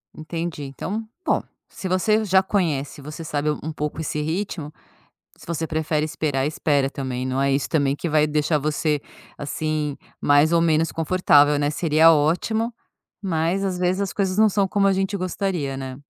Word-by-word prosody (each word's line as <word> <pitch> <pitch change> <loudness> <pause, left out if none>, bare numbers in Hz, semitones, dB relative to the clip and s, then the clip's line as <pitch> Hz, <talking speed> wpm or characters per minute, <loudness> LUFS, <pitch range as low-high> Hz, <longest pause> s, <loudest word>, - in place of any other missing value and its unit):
Entendi, 165 -1 -5
então, 185 +11 -4 0.2
bom, - - +2 0.3
se 190 - -7
você 215 +4 +2
já 190 -1 +4
conhece 155 -9 -1
e - - -14
você 155 +3 -7
sabe 150 -1 -1
um 150 +1 -3
pouco 150 +1 -4
esse 150 -1 -2
ritmo, 160 -1 -3 0.7
se - - -15
você 160 -1 -3
prefere 155 -1 0
esperar, 145 -3 -1
espera 145 -2 +1
também, 130 -2 -4
não 130 +1 -1
é 140 - +2
isso 135 +1 0
também 140 -4 +1
que 170 - -4
vai 150 -1 +3
deixar 150 +1 +1
você, 150 0 0 0.4
assim, 150 0 -2 0.2
mais 145 +3 +4
ou 170 - +4
menos 165 0 +2
confortável, 150 -4 +4
né, 145 0 +1
seria 160 +1 +5
ótimo, 220 +10 +1 0.5
mas, 180 +1 0
às 185 -2 -1
vezes, 180 +2 +1
as 195 - -2
coisas 190 -1 -1
não 220 0 +6
são 200 -1 +2
como 200 0 +2
a 195 - +4
gente 195 +1 -1
gostaria, 180 -6 -2
né. 130 -1 -6
155 Hz, 180 wpm, -23 LUFS, 145-185 Hz, 0.7 s, não